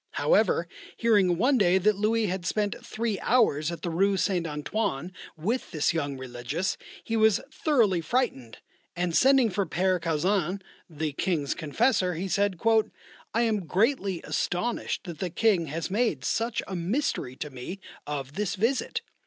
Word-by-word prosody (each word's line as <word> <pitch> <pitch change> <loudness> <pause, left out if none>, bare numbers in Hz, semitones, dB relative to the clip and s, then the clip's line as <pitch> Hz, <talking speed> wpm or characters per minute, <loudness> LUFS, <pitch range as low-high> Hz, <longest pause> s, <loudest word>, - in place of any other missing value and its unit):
However, - - +2 0.3
hearing 200 -7 +3
one 255 +6 +3
day 185 -2 +4
that 210 +3 +3
Louis 215 +2 +1
had 185 -2 -2
spent 205 +3 -1
three 220 -3 -2
hours 175 - +2
at 170 -2 -7
the 170 - -2
Rue 195 +4 +2
St. 180 -4 0
Antoine 150 +1 -2 0.3
with 220 +11 -2
this 155 +1 +1
young 145 -4 -2
religious, 130 +8 -3 0.3
he 225 - -2
was 220 -2 +4
thoroughly 225 - +2
frightened, 160 - -1 0.4
and 175 -1 -1
sending 265 -4 +5
for 195 0 -1
Père 185 +2 +1
Caussin, 175 +3 0 0.3
the 155 -1 -3
King's 150 -3 -1
confessor, 180 - +1
he 185 +4 -3
said: 200 -1 0 0.8
"I 230 - +3
am 210 -6 0
greatly 200 - +1
astonished 230 +7 -2
that 170 -5 -8
the 185 - -2
King 180 -2 +2
has 160 +4 -4
made 205 - 0
such 230 0 0
a 190 - -4
mystery 180 - -1
to 150 +2 -6
me 130 +10 -7 0.3
of 140 -2 -4
this 205 +2 -2
visit. 230 +7 0
185 Hz, 155 wpm, -27 LUFS, 160-220 Hz, 0.8 s, sending